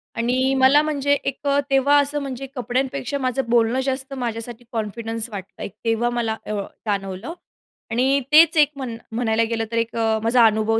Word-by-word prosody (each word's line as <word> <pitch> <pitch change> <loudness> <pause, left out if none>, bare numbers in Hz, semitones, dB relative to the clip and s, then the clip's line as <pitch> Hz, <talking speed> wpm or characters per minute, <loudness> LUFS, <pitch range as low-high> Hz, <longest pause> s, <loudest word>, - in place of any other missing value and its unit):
आणि 255 +3 +1
मला 265 +3 +6
म्हणजे 285 -2 0
एक 275 +1 -4
अ, 280 0 +3
तेव्हा 275 +1 +4
असं 290 +1 -2
म्हणजे 270 -1 -5
कपड्यांपेक्षा 260 +2 -2
माझं 255 -1 -1
बोलणं 235 +1 +3
जास्त 265 0 -3
माझ्यासाठी 240 -2 -5
कॉन्फिडन्स 225 +1 -4
वाटत 195 -2 -9
आहे. - - -5 0.2
तेव्हा 230 +1 +1
मला 235 -2 -1
अ, - - -5 0.3
जाणवलं 195 - -3 0.6
आणि 260 +4 +2
तेच 320 +2 +7
एक 295 -1 +5
म्हण 255 -4 -5
म्हणायला 225 -1 +1
गेलं 225 -1 -1
तर 230 - -1
एक 230 0 -1
अ, 225 -1 +1
माझा 230 +1 +5
अनुभव 220 +1 +2
245 Hz, 170 wpm, -22 LUFS, 225-270 Hz, 0.6 s, तेच